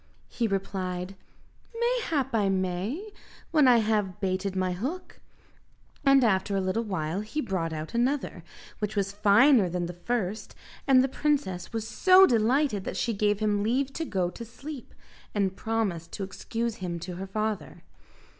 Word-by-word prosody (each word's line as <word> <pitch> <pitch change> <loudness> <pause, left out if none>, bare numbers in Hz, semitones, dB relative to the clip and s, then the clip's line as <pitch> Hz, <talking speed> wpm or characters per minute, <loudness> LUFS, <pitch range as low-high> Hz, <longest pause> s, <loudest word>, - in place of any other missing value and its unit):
He 235 - -1
replied, 190 -2 -3 0.6
"Mayhap 385 - 0
I 205 -3 +2
may, 195 - -2 0.4
when 305 -5 +5
I 245 -1 +7
have 210 -4 0
baited 190 0 -1
my 185 -1 0
hook;" 270 - -5 0.8
and 275 -2 +5
after 200 -2 +2
a - - +2
little 185 +4 0
while 185 -4 -2
he 220 +8 -4
brought 185 - -2
out 155 0 -5
another, 260 +4 -1 0.4
which 210 0 -3
was 195 -1 0
finer 210 +2 +5
than 175 0 -2
the 175 - -5
first, 210 +2 -3 0.3
and 260 -2 +6
the - - +2
princess 270 - -1
was 225 -1 -3
so 375 +8 +6
delighted 240 - +2
that - - -4
she 235 - 0
gave 205 0 +1
him 205 -1 +1
leave 260 +6 0
to 325 - -3
go 185 - -1
to 235 - -8
sleep, 265 +3 -9 0.4
and 195 -2 +1
promised 200 -8 -2
to 200 - -4
excuse 230 +4 -4
him 175 -2 -4
to 175 0 -6
her 195 +1 -5
father. 215 +1 -3
210 Hz, 160 wpm, -27 LUFS, 190-250 Hz, 0.8 s, I